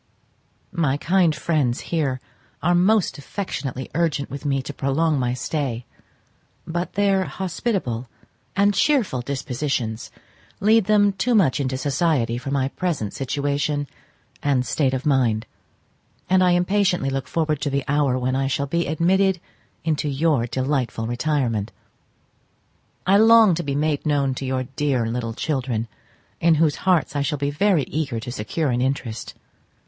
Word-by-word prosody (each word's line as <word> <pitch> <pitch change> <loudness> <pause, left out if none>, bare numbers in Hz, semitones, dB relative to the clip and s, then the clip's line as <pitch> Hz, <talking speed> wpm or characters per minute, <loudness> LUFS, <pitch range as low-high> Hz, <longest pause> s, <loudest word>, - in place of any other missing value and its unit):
My 150 -6 +1
kind 170 0 +2
friends 150 -7 0
here 145 -6 -1 0.4
are 175 +2 +3
most 185 -1 +2
affectionately 140 -6 -5
urgent 150 -4 0
with 140 +2 -7
me 135 -2 0
to - - -6
prolong 145 +2 +1
my 125 -1 0
stay, 125 -2 -3 0.8
but 175 +2 -3
their 195 -2 +2
hospitable 175 - -3 0.5
and 200 +1 +3
cheerful 220 - +2
dispositions 125 -3 -3 0.5
lead 220 +1 +4
them 205 -1 +4
too 230 +6 +1
much 165 -12 +3
into 130 -2 -1
society 135 -4 0
for 130 - -6
my 135 -1 0
present 150 - -2
situation 145 +2 -1 0.6
and 135 -3 +1
state 135 -2 +1
of 130 - -4
mind; 120 -6 +2 0.8
and 185 0 +4
I 180 -1 +4
impatiently 180 -4 +1
look 135 -1 -3
forward 155 +1 -1
to 145 - 0
the 140 0 -1
hour 140 -3 +2
when 130 +1 -1
I 135 0 0
shall 140 +1 -1
be 170 +4 -1
admitted 185 +4 +2 0.4
into 155 -2 0
your 140 -3 +1
delightful 130 -3 -1
retirement. 120 -4 -1 1.3
I 195 +2 +5
long 225 -2 +7
to 170 - -1
be 140 -4 -3
made 150 0 0
known 140 -3 +1
to 135 - -5
your 130 0 -1
dear 130 -1 -1
little 115 0 -3
children, 125 -6 -2 0.5
in 165 -1 +4
whose 155 -1 +2
hearts 170 -5 +2
I 145 - +1
shall 145 +1 -1
be 140 +1 -1
very 175 0 +2
eager 135 -3 -3
to 115 +2 -6
secure 130 +6 -2
an 120 0 0
interest. 130 -4 -3
145 Hz, 150 wpm, -23 LUFS, 130-170 Hz, 1.3 s, long